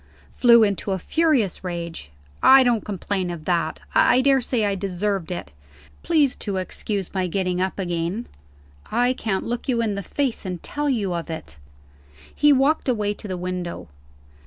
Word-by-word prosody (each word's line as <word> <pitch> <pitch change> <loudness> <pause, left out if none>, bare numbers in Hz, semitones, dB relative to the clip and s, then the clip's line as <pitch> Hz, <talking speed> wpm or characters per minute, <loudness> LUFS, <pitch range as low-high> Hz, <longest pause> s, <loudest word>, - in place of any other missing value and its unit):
"Flew 235 -2 +6
into 200 -1 0
a - - -1
furious 270 - +1
rage. 170 - -5 0.3
I 265 0 +8
don't 240 -3 +1
complain 195 -2 -3
of 170 -3 -6
that; 175 -2 0
I 250 - +5
daresay 260 -4 +2
I 200 - +1
deserved 195 -1 -2
it. 175 - -5 0.5
Please 305 -6 +2
to 200 -3 -3
excuse 190 +1 -4
my 185 -2 0
getting 180 0 -1
up 190 0 -1
again. 175 +4 -2 0.7
I 245 +3 +2
can't 220 -6 -2
look 240 +3 -4
you 240 -2 +2
in 225 -3 0
the 200 - -3
face, 265 +4 -2
and 185 -2 -4
tell 295 0 -2
you 205 -8 0
of 170 -1 -4
it." 160 - -7 0.8
He 295 0 +4
walked 280 +1 +2
away 210 -4 0
to 210 - -9
the 185 -2 -4
window. 180 - -5
200 Hz, 165 wpm, -23 LUFS, 180-245 Hz, 0.8 s, I